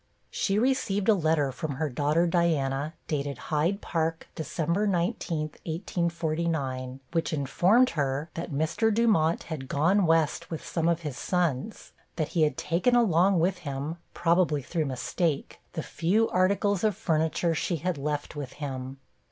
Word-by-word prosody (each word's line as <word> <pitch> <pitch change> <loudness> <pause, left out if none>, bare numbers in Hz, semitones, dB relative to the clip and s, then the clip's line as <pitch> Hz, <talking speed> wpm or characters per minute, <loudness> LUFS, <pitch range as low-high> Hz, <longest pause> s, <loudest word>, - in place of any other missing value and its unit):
She 195 0 0
received 220 -5 +1
a - - +8
letter 160 -6 +1
from 150 +2 -4
her 155 +3 -1
daughter 150 +5 +1
Diana, 155 -4 +1
dated 145 -2 -2
Hyde 165 +7 0
Park, 165 -1 -2
December 170 +5 -1
19, 170 -3 0 0.3
1849, 160 -6 -2
which 165 -1 0
informed 175 - +3
her 140 0 -1
that 170 0 -5
Mr. 170 +10 +1
Dumont 205 -8 +2
had 150 -5 -6
'gone 175 +8 +2
West' 160 -2 +2
with 160 - -5
some 165 -1 0
of 170 0 +1
his 150 -5 -5
sons 175 - -1 0.2
that 155 -3 -1
he 170 - 0
had 155 -1 +2
taken 175 +11 +1
along 195 -5 +4
with 180 +2 +1
him, 145 0 -4 0.2
probably 165 -4 +2
through 160 +3 -1
mistake, 140 +3 -2
the - - -3
few 195 +9 +1
articles 195 +2 +2
of 210 -3 +2
furniture 165 -3 +1
she 170 +2 -1
had 165 -1 -2
left 150 +1 -3
with 140 -3 -6
him. 135 -2 -5
165 Hz, 150 wpm, -27 LUFS, 150-180 Hz, 0.3 s, a